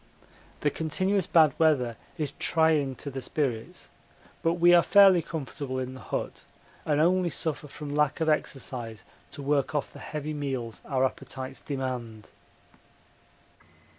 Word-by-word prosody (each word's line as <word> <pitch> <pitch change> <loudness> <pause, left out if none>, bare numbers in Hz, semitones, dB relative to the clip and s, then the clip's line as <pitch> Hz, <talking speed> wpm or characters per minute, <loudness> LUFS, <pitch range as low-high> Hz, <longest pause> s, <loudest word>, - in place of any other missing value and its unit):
The 145 - +2
continuous 185 +5 0
bad 155 -5 +5
weather 135 -8 +3 0.2
is 150 -3 -2
trying 155 -5 +2
to 140 - -7
the 135 0 -5
spirits, 125 -6 -3 0.5
but 165 - +2
we 175 0 +5
are 175 - +8
fairly 195 -2 +6
comfortable 140 -4 -5
in 130 0 -3
the 130 - -10
hut - - -4 0.4
and 150 -1 +2
only 180 +2 +3
suffer 155 -2 -3
from 145 0 -7
lack 150 0 +2
of 160 - 0
exercise 125 -7 -2 0.3
to 140 0 -8
work 140 +1 0
off 145 - -2
the - - -11
heavy 155 0 -5
meals 130 -6 -4
our 130 -2 +2
appetites 130 0 -5
demand. 125 -6 -5
145 Hz, 140 wpm, -28 LUFS, 130-160 Hz, 0.5 s, are